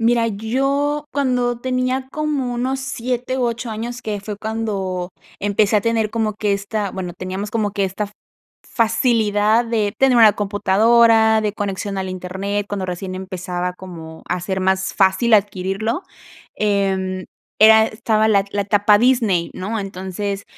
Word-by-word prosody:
Mira, 230 Hz, 0 st, +2 dB
yo 275 Hz, +7 st, -1 dB
cuando 250 Hz, -3 st, 0 dB
tenía 255 Hz, +1 st, -1 dB
como 295 Hz, -5 st, -2 dB
unos 260 Hz, +2 st, -1 dB
7 255 Hz, 0 st, -3 dB
u 255 Hz, -, -1 dB
8 235 Hz, 0 st, -3 dB
años, 235 Hz, +3 st, -5 dB
que 210 Hz, -4 st, -4 dB
fue 205 Hz, 0 st, -6 dB
cuando 200 Hz, -5 st, -3 dB, 0.3 s
empecé 205 Hz, +1 st, +2 dB
a 205 Hz, -, +3 dB
tener 225 Hz, -1 st, 0 dB
como 220 Hz, -2 st, -1 dB
que 210 Hz, -1 st, 0 dB
esta, 200 Hz, 0 st, -2 dB
bueno, 180 Hz, -2 st, -5 dB
teníamos 190 Hz, +3 st, -5 dB
como 215 Hz, -2 st, -1 dB
que 200 Hz, -1 st, 0 dB
esta 190 Hz, +3 st, -2 dB
f 205 Hz, -, -11 dB, 0.5 s
facilidad 225 Hz, -1 st, +2 dB
de 215 Hz, -3 st, 0 dB
tener 265 Hz, -2 st, +4 dB
una 220 Hz, -3 st, +7 dB
computadora, 220 Hz, +2 st, +4 dB
de 210 Hz, -1 st, -1 dB
conexión 200 Hz, -1 st, -3 dB
al 190 Hz, 0 st, -3 dB
Internet, 190 Hz, +3 st, -3 dB
cuando 195 Hz, -2 st, -3 dB
recién 185 Hz, +1 st, -5 dB
empezaba 180 Hz, -1 st, -4 dB
como 165 Hz, -3 st, -10 dB
a 180 Hz, 0 st, -1 dB
ser 190 Hz, +1 st, -3 dB
más 190 Hz, 0 st, 0 dB
fácil 195 Hz, +4 st, +3 dB
adquirirlo, 205 Hz, -, 0 dB, 0.5 s
em, 190 Hz, -2 st, 0 dB, 0.4 s
era 220 Hz, 0 st, +8 dB
estaba 220 Hz, 0 st, +1 dB
la 200 Hz, -2 st, +3 dB
la 205 Hz, -, 0 dB
etapa 205 Hz, +1 st, +4 dB
Disney, 225 Hz, -8 st, +2 dB
¿no? 210 Hz, +4 st, -3 dB
Entonces, 195 Hz, +1 st, -4 dB
210 Hz, 150 wpm, -20 LUFS, 190-230 Hz, 0.5 s, era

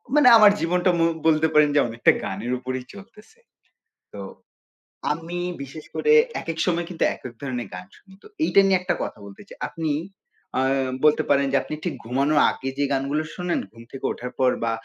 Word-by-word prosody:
মানে 295 Hz, -4 st, +6 dB
আমার 210 Hz, -2 st, +8 dB
জীবনটা 180 Hz, +2 st, +1 dB
মো 165 Hz, -, +4 dB, 0.2 s
বলতে 160 Hz, 0 st, +3 dB
পারেন 150 Hz, -1 st, +5 dB
যে -, -, +5 dB
অনেকটা 115 Hz, +1 st, +3 dB
গানের 105 Hz, +6 st, -4 dB
উপরেই 130 Hz, 0 st, -5 dB
চলতেছে। 210 Hz, -, -15 dB, 0.7 s
তো -, -, -8 dB, 0.9 s
আমি 165 Hz, +3 st, -5 dB, 0.2 s
বিশেষ 140 Hz, +3 st, -9 dB
করে 455 Hz, -, +1 dB, 0.3 s
একেক 165 Hz, -1 st, -5 dB
সময় 170 Hz, -1 st, 0 dB
কিন্তু 175 Hz, -, -2 dB
একেক 125 Hz, -2 st, -10 dB
ধরণের 125 Hz, -5 st, -4 dB
গান 90 Hz, 0 st, -7 dB
শুনি 190 Hz, -1 st, -20 dB
তো। -, -, -13 dB, 0.2 s
এইটা 195 Hz, -, +5 dB
নিয়ে 190 Hz, -1 st, +3 dB
একটা 180 Hz, -, -1 dB
কথা -, -, -7 dB
বলতে 100 Hz, -1 st, -12 dB
চাই। -, -, -13 dB
আপনি 160 Hz, -3 st, -3 dB, 0.7 s
আ -, -, +3 dB, 0.4 s
বলতে 150 Hz, -, +4 dB
পারেন 140 Hz, -1 st, +3 dB
যে 140 Hz, -, +3 dB
আপনি 155 Hz, -, -5 dB
ঠিক 175 Hz, -, -2 dB
ঘুমানোর 140 Hz, +5 st, +1 dB
আগে 135 Hz, -, -5 dB
যে 145 Hz, -, +1 dB
গানগুলো 140 Hz, +3 st, 0 dB
শোনেন 180 Hz, -1 st, -1 dB
ঘুম 115 Hz, 0 st, -14 dB
থেকে 135 Hz, -, -7 dB
ওঠার 125 Hz, +1 st, -6 dB
পর 130 Hz, -1 st, +4 dB
বা 115 Hz, -, 0 dB
150 Hz, 185 wpm, -23 LUFS, 130-175 Hz, 0.9 s, আমার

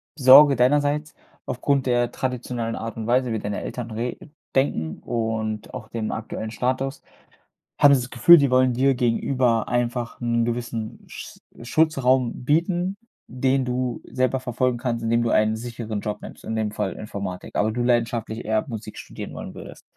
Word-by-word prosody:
Sorge 140 Hz, +1 st, +8 dB
deinerseits 145 Hz, +4 st, +1 dB, 0.3 s
aufgrund 140 Hz, +2 st, 0 dB
der 120 Hz, -1 st, +1 dB
traditionellen 120 Hz, -3 st, -3 dB
Art 115 Hz, 0 st, -5 dB
und 110 Hz, -1 st, -4 dB
Weise, 125 Hz, 0 st, +2 dB
wie 110 Hz, -, -1 dB
deine 105 Hz, 0 st, -4 dB
Eltern 120 Hz, -2 st, -6 dB
re 115 Hz, +3 st, -3 dB, 0.4 s
denken 80 Hz, -, 0 dB
und 110 Hz, -2 st, -3 dB
auch 115 Hz, -4 st, -8 dB
dem 110 Hz, -2 st, -3 dB
aktuellen 110 Hz, 0 st, -5 dB
Status, 130 Hz, +4 st, -2 dB, 0.8 s
hattest 140 Hz, -2 st, +6 dB
du -, -, -6 dB
das -, -, -25 dB
Gefühl, 170 Hz, +9 st, +8 dB
die 140 Hz, -3 st, +3 dB
wollen 130 Hz, 0 st, +3 dB
dir 135 Hz, +2 st, +2 dB
gegenüber 120 Hz, -1 st, +1 dB
einfach 120 Hz, -1 st, -2 dB
'n 120 Hz, -1 st, +1 dB
gewissen 120 Hz, -2 st, -4 dB
Sch -, -, -10 dB, 0.2 s
Schutzraum 130 Hz, -3 st, +1 dB
bieten, 175 Hz, +6 st, +1 dB, 0.3 s
den 130 Hz, +2 st, +1 dB
du 125 Hz, -1 st, -2 dB
selber 130 Hz, +1 st, 0 dB
verfolgen 125 Hz, -1 st, -1 dB
kannst, 120 Hz, -1 st, -2 dB
indem 115 Hz, +1 st, +2 dB
du 115 Hz, -, 0 dB
einen 110 Hz, +1 st, +2 dB
sicheren 115 Hz, -2 st, -5 dB
Job 105 Hz, 0 st, -4 dB
nimmst, -, -, -11 dB
in 110 Hz, -, -3 dB
dem 110 Hz, -1 st, -1 dB
Fall 105 Hz, -3 st, -2 dB
Informatik, 100 Hz, -4 st, -7 dB
aber 110 Hz, +2 st, +2 dB
du 120 Hz, +1 st, -1 dB
leidenschaftlich 115 Hz, -2 st, 0 dB
eher 110 Hz, 0 st, 0 dB
Musik 110 Hz, -2 st, -7 dB
studieren -, -, -8 dB
wollen -, -, -7 dB
würdest. -, -, -11 dB
120 Hz, 165 wpm, -23 LUFS, 110-130 Hz, 0.8 s, Sorge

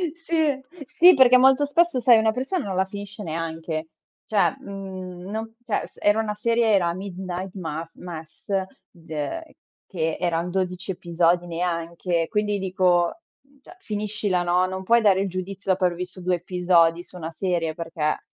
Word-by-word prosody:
Sì, 335 Hz, 0 st, -5 dB
e 290 Hz, -4 st, +1 dB, 0.3 s
sì 360 Hz, +1 st, +7 dB
perché 255 Hz, -2 st, +7 dB
molto 265 Hz, +2 st, +5 dB
spesso 330 Hz, -2 st, +2 dB
sai, 235 Hz, -1 st, +6 dB
una 220 Hz, 0 st, +3 dB
persona 265 Hz, -, -2 dB
non 190 Hz, -2 st, -3 dB
la 190 Hz, -, +3 dB
finisce 200 Hz, +1 st, -8 dB
neanche; 160 Hz, -1 st, -4 dB, 0.4 s
cioè 215 Hz, +5 st, +2 dB
mhmm, 190 Hz, -3 st, -8 dB
non 225 Hz, +1 st, -5 dB
cioè 220 Hz, -4 st, -1 dB
s -, -, -21 dB
era 205 Hz, +2 st, +3 dB
una 210 Hz, -1 st, -2 dB
serie 230 Hz, +1 st, +1 dB
era 175 Hz, -4 st, +3 dB
Midnight 185 Hz, 0 st, -6 dB
Mass 165 Hz, -2 st, -6 dB
Mess, 165 Hz, +1 st, -10 dB, 0.4 s
ge 170 Hz, -, -6 dB, 0.3 s
che 160 Hz, -4 st, -2 dB
eran 175 Hz, 0 st, -1 dB
12 185 Hz, 0 st, -2 dB
episodi 175 Hz, 0 st, +1 dB
neanche, 170 Hz, 0 st, -2 dB
quindi 210 Hz, -2 st, 0 dB
dico: 185 Hz, -, +1 dB, 0.2 s
"Mhmm, 280 Hz, 0 st, -28 dB
cioè 360 Hz, -, -15 dB
finiscila, 210 Hz, -, -1 dB
no. 180 Hz, +1 st, +2 dB
Non 190 Hz, 0 st, -5 dB
puoi 235 Hz, +5 st, +4 dB
dare 195 Hz, -2 st, +4 dB
il 195 Hz, -, 0 dB
giudizio 190 Hz, +1 st, -5 dB
dopo 185 Hz, 0 st, 0 dB
aver 175 Hz, -1 st, +2 dB
visto 180 Hz, +1 st, -6 dB
2 180 Hz, 0 st, +1 dB
episodi 175 Hz, -1 st, +2 dB
su 180 Hz, -, -15 dB
una 165 Hz, -1 st, -5 dB
serie, 165 Hz, -2 st, -1 dB
perché, 165 Hz, -2 st, -2 dB
185 Hz, 165 wpm, -24 LUFS, 175-215 Hz, 0.4 s, sì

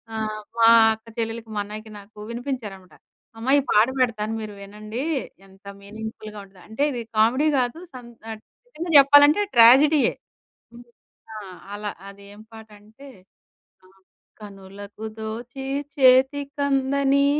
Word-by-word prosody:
ఆహ్, 215 Hz, -1 st, -4 dB, 0.2 s
మా 225 Hz, -, +6 dB, 0.3 s
అక్క 220 Hz, +1 st, -15 dB
చెల్లెలికి, 225 Hz, 0 st, -4 dB
మా -, -, -1 dB
అన్నయ్యకి 215 Hz, +1 st, -10 dB
నాకు 205 Hz, +2 st, -19 dB
వినిపించారన్నమాట. 230 Hz, -, -7 dB, 0.4 s
"అమ్మా 235 Hz, +4 st, -2 dB
ఈ -, -, 0 dB
పాట 215 Hz, +2 st, +4 dB
పెడతాను 225 Hz, -3 st, -1 dB
మీరు 215 Hz, -1 st, -8 dB
వినండి. 215 Hz, +5 st, -7 dB, 0.4 s
ఎంత 195 Hz, +1 st, -23 dB, 0.2 s
మీనింగ్‌ఫుల్‌గా 215 Hz, +1 st, -9 dB
ఉంటది" 190 Hz, -2 st, -21 dB
అంటే 220 Hz, +6 st, -3 dB
ఇది 245 Hz, -3 st, -5 dB, 0.2 s
కామెడీ 245 Hz, +8 st, +3 dB
గాదు 250 Hz, +5 st, -2 dB
సం 250 Hz, -2 st, -11 dB, 0.2 s
ఆహ్, 220 Hz, -1 st, -7 dB, 0.3 s
నిజంగా 345 Hz, -8 st, -7 dB
చెప్పాలంటే 290 Hz, +6 st, +6 dB
ట్రాజెడీయే. 270 Hz, +6 st, +6 dB, 0.6 s
హ్మ్. 240 Hz, 0 st, -15 dB, 0.5 s
ఆ! -, -, -6 dB, 0.4 s
అలా. 205 Hz, 0 st, -5 dB, 0.2 s
అది 200 Hz, 0 st, -16 dB
ఏం 210 Hz, -, -14 dB
పాటంటే, 220 Hz, +4 st, -15 dB, 0.8 s
ఆహ్, 190 Hz, +1 st, -25 dB, 0.4 s
కనులకు 200 Hz, +1 st, -11 dB
దోచి 235 Hz, +5 st, -7 dB, 0.3 s
చేతికందని 275 Hz, +1 st, +2 dB
225 Hz, 125 wpm, -23 LUFS, 210-265 Hz, 0.8 s, మా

